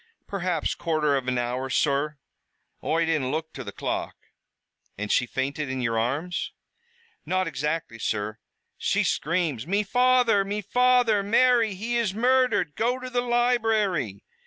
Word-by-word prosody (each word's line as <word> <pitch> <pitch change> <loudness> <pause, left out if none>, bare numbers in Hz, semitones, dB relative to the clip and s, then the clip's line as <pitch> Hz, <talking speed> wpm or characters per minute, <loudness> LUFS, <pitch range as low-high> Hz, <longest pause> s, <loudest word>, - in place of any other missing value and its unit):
"Perhaps 180 -5 -1
quarter 155 -3 0
av 130 -2 -2
an 125 -1 0
hour, 125 +2 -2
sur. 145 +2 +1 0.7
Oi 165 +1 +1
didn't 155 -6 0
look 160 +2 -3
to 135 - -6
the 100 - -7
clock." - - -3 0.8
"And 105 +1 -3
she 125 - +2
fainted 140 +3 -3
in 130 0 -3
your 115 -2 0
arms?" 150 +10 -2 0.7
"Not 185 0 0
exactly 150 -4 -3
that, - - -13
sur. 105 +1 -2 0.4
She - - +1
scr'ams, 155 -6 -1
'Me 200 +3 +1
father! 245 -2 +3
me 205 +2 -3
father! 245 -1 +3
Mary, 230 0 +3
he 230 +5 -2
is 215 -5 0
murdered! 250 - +2
Go 245 +3 0
to 255 0 -7
the 245 0 +1
library!' 225 - +1
170 Hz, 150 wpm, -26 LUFS, -, 0.8 s, father